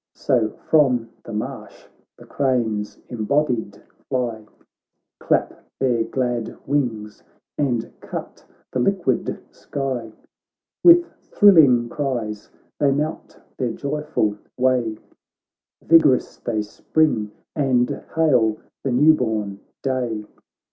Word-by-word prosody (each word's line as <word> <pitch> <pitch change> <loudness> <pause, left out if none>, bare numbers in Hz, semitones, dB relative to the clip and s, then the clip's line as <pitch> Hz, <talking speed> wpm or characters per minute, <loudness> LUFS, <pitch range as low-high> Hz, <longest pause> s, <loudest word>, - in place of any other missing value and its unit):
So 115 -4 +1 0.2
from 125 -7 +3
the - - -8
marsh 105 0 -6 0.3
the - - -14
cranes 115 -6 -1
embodied 120 -3 -1 0.3
fly,, 120 -5 -2 0.7
Clap - - 0 0.2
their 120 -4 +2
glad 120 -3 -2
wings 115 -7 -2 0.3
and 120 -5 0
cut - - -7 0.3
the 130 - -1
liquid 170 -3 0
sky; 130 -5 -4 0.7
With 345 0 +8 0.2
thrilling 150 - +5
cries 120 -6 -3 0.3
they 145 - +3
mount 150 +3 -3 0.2
their 120 -3 -1
joyful 140 -8 -2 0.2
way, 125 -4 +1 0.9
Vig'rous 155 -6 +4
they 110 -3 -2
spring, 110 0 0 0.3
and 130 -4 +1
hail 125 -9 +3 0.3
the 135 - -1
new 150 +6 +6
born 110 -7 -2 0.2
day. 125 -5 -2
125 Hz, 100 wpm, -22 LUFS, 110-140 Hz, 0.9 s, With